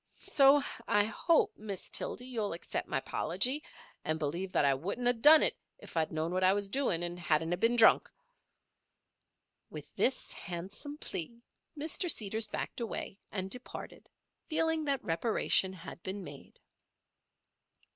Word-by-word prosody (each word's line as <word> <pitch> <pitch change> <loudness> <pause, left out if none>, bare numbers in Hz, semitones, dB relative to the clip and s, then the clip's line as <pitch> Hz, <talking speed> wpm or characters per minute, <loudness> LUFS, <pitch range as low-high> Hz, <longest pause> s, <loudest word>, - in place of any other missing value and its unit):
So 275 0 +5 0.2
I 205 0 +3
hope, 265 +10 +1
Miss 205 -3 -3
Tildy, 250 - -3
you'll 225 -7 -2
accept 170 - -4
my 145 - -1
'pology, 245 - -1 0.4
and 155 0 0
believe 170 +5 -3
that - - +3
I 140 - +4
wouldn't 200 - -3
of 245 -2 +2
done 305 +3 +8
it - - +2 0.2
if - - -12
I'd 160 -1 0
known 160 +1 -2
what 185 0 0
I 185 +1 +5
was 200 -1 -2
doin' 205 -11 +1
and 175 0 -2
hadn't 165 0 +1
of 175 - -3
been 230 +4 +3
drunk." 225 -2 +6 1.6
With - - -10
this 265 - +2
handsome 195 - -5
plea 195 - -5 0.4
Mr. 320 +4 0
Seeders 220 -4 +1
backed 210 - -4
away, 210 -3 -4
and 190 -1 -4
departed, 250 0 -7 0.4
feeling 320 -1 +1
that 280 -2 -1
reparation 190 +1 +2
had 185 -1 -10
been 190 +2 -5
made. 145 -4 -12
200 Hz, 150 wpm, -31 LUFS, 175-250 Hz, 1.6 s, done